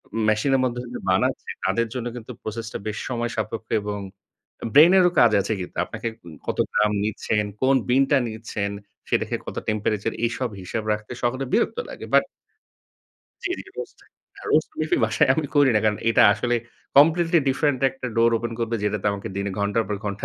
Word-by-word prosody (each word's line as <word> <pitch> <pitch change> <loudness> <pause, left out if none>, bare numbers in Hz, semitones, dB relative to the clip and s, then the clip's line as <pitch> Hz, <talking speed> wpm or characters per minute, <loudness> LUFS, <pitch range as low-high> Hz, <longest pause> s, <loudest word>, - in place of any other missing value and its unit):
ম - - -1
মেশিনের 130 +5 +2
মধ্যে 125 -1 -2
যে - - -4
বানাচ্ছে 95 +1 +1 0.2
তাদের 115 0 +1
জন্য 125 -2 -3
কিন্তু 120 0 -8
প্রসেসটা 110 +1 -5
বেশ 105 - -3
সময়সাপেক্ষ 115 -2 -3
এবং 105 0 -4 0.7
ব্রেইন 160 +4 +8
এরও 180 -1 +5
কাজ 120 -2 +6
আছে 100 - -2
কিন্তু। 90 - -8
আপনাকে 115 +3 -5 0.4
কত - - -2 0.2
গ্রাম 105 0 +3
নিচ্ছেন? 105 0 -1 0.2
কোন 135 +1 +4
বিনটা 135 +3 +4
নিচ্ছেন? 110 -2 -4 0.4
সেটাকে - - 0
কত - - -7
টেম্পেরেচার? 105 -1 -1
এইসব 120 +2 -2
হিসাব 105 +5 -4
রাখতে 105 0 -7
সকলের 130 +2 0
বিরক্ত 235 - +2
লাগে। - - -8
বাট - - +5 1.2
জ্বী, 350 - 0
জ্বী। - - -12
রোস্ট - - -7 0.4
আ - - -11
রোস্ট 155 - +3
কফি 155 - -1
আমি - - +2
বাসায় 130 +5 +2
আমি 155 0 -1
করি 145 -2 +6
না। 105 - +4
কারণ 105 -1 +2
এটা 115 - +5
আসলে 120 +4 -1 0.4
কমপ্লিটলি 165 +4 +5
ডিফারেন্ট 135 -1 +1
একটা 135 -1 -7
ডোর 115 0 +5
ওপেন 120 +1 -4
করবে 115 0 -1
যেটাতে 105 -1 -1
আমাকে 100 -1 -5
দিনে 100 0 -2
ঘন্টার 100 +2 +1
পর 105 - -1
ঘন্টা 100 +1 -4
115 Hz, 180 wpm, -24 LUFS, 105-130 Hz, 1.2 s, ব্রেইন